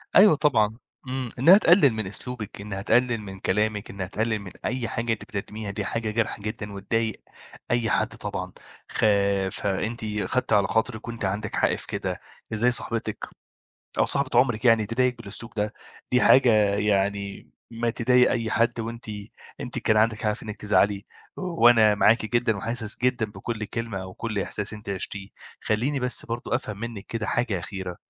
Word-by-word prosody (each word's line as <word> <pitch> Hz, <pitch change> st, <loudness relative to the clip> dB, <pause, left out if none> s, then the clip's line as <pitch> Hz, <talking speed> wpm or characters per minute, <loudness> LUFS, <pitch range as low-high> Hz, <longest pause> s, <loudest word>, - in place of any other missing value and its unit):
أيوه 200 Hz, -5 st, +8 dB
طبعًا 115 Hz, -8 st, +2 dB, 0.3 s
إمم، 130 Hz, -2 st, -3 dB
إنها 175 Hz, +9 st, +8 dB
تقلل 165 Hz, -, +5 dB
من 110 Hz, -3 st, -3 dB
أسلوبِك 105 Hz, -1 st, -6 dB
إنها 100 Hz, -1 st, -5 dB
تقلل 120 Hz, +2 st, +2 dB
من 95 Hz, -2 st, -9 dB
كلامِك 105 Hz, +2 st, 0 dB
إنها 95 Hz, -2 st, -5 dB
تقلل 110 Hz, +1 st, -1 dB
من 95 Hz, -3 st, -9 dB
أي 120 Hz, -1 st, -1 dB
حاجة 115 Hz, 0 st, -2 dB
أنتِ -, -, -6 dB
بتقدميها 105 Hz, -2 st, -5 dB
دي 100 Hz, 0 st, -4 dB
حاجة 115 Hz, -2 st, -2 dB
جارحة 115 Hz, 0 st, -1 dB
جدًا 105 Hz, -1 st, -5 dB
وتضايق 110 Hz, +3 st, -1 dB, 0.5 s
أي 120 Hz, -2 st, +1 dB
حد 110 Hz, 0 st, +2 dB
طبعًا، 95 Hz, -3 st, -5 dB, 0.4 s
خا 100 Hz, -2 st, +2 dB
فأنتِ 100 Hz, +5 st, -2 dB, 0.2 s
خدتِ 125 Hz, +2 st, 0 dB
على 100 Hz, -1 st, +4 dB
خاطرِك 110 Hz, 0 st, -1 dB
وأنتِ 115 Hz, -3 st, -4 dB
عندِك 105 Hz, +2 st, -2 dB
حق -, -, +2 dB
في -, -, -7 dB
كده -, -, -3 dB, 0.3 s
إزاي 120 Hz, +3 st, +3 dB
صاحبتِك 115 Hz, -1 st, -1 dB, 0.7 s
أو -, -, +5 dB
صاحبة 140 Hz, -1 st, 0 dB
عمرِك 120 Hz, -4 st, +2 dB
يعني 115 Hz, -3 st, +5 dB
تضايقِك 125 Hz, +2 st, +1 dB
بالأسلوب 115 Hz, +2 st, -8 dB
ده؟ 105 Hz, 0 st, -1 dB, 0.4 s
دي 125 Hz, -, +5 dB
حاجة 130 Hz, -2 st, +6 dB, 0.2 s
يعني 100 Hz, -1 st, -1 dB, 0.2 s
ما 115 Hz, 0 st, -1 dB
تضايق 125 Hz, +1 st, +3 dB
أي 115 Hz, -2 st, -1 dB
حد 120 Hz, +1 st, +1 dB
وأنتِ 115 Hz, +1 st, -6 dB, 0.5 s
أنتِ -, -, -4 dB
كان 110 Hz, -, +2 dB
عندِك 110 Hz, 0 st, +3 dB
حق 105 Hz, -, +2 dB
في 105 Hz, -, -8 dB
إنِّك 105 Hz, -1 st, -6 dB
تزعلي 105 Hz, 0 st, +2 dB, 0.3 s
وأنا 120 Hz, -, +4 dB
معاكِ 110 Hz, +2 st, +4 dB
جدًا 115 Hz, -3 st, +1 dB
وحاسس 115 Hz, +1 st, -1 dB
جدًا 125 Hz, -3 st, +2 dB
بكل 110 Hz, +1 st, -5 dB
كلمة 110 Hz, -3 st, -4 dB
وكل 105 Hz, +3 st, -5 dB
إحساس 100 Hz, +1 st, -2 dB
أنتِ 105 Hz, -1 st, -8 dB
عِشتيه، 100 Hz, +1 st, -3 dB, 0.3 s
خلّيني 130 Hz, +6 st, 0 dB
بس 125 Hz, 0 st, -1 dB
برضو 115 Hz, +1 st, -5 dB
أفهم 105 Hz, -4 st, -3 dB
منِك 115 Hz, -3 st, -6 dB
كده 115 Hz, -2 st, -3 dB
حاجة 115 Hz, -5 st, 0 dB
أخيرة 90 Hz, 0 st, -6 dB
110 Hz, 170 wpm, -25 LUFS, 105-120 Hz, 0.7 s, أيوه